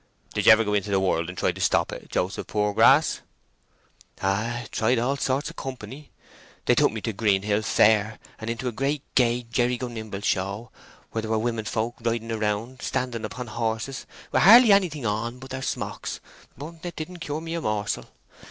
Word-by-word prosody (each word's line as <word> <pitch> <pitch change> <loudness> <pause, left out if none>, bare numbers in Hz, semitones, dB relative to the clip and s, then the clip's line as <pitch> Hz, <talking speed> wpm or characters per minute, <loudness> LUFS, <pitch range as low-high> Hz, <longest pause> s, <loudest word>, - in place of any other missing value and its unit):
"Did 105 0 -1
ye - - +11
ever 110 +1 +6
go 105 -1 -1
into 105 0 0
the 100 -1 +2
world 85 -3 0
to 90 - -6
try - - +1
and - - -4
stop - - +2
it, - - -9
Joseph 95 +3 -2
Poorgrass?" 105 -1 +3 1.0
"Oh - - +2
ay, 115 +4 -2
tried 115 +3 +1
all 125 +4 +1
sorts 140 +1 -1
o' - - -15
company. 130 +2 -8 0.6
They - - +4
took - - +3
me 110 0 -5
to 115 - -3
Greenhill 105 0 +1
Fair, 110 +1 +3 0.2
and 110 - -5
into 115 +2 -3
a - - 0
great 135 +4 -1
gay 120 -1 +2
jerry 120 +1 0
go 125 - -4
nimble 110 -4 -6
show, 100 +4 -2 0.4
where 110 - -2
there 110 - -6
were 110 - +2
women 115 -1 -2
folk 115 +2 -2
riding 115 0 -2
round—standing 115 +2 -2
upon 125 +4 -6
horses, 115 +3 -3 0.2
with - - +3
hardly 225 +4 +9
anything 175 -9 +2
on 115 +3 -2
but 130 +1 -11
their 130 0 -4
smocks; - - -4 0.4
but 160 +4 -9
it 175 -1 -5
didn't 175 +3 -7
cure 150 -1 -4
me 165 0 -6
a 170 - -2
morsel. 105 -5 -2
115 Hz, 190 wpm, -25 LUFS, 105-130 Hz, 1.0 s, ye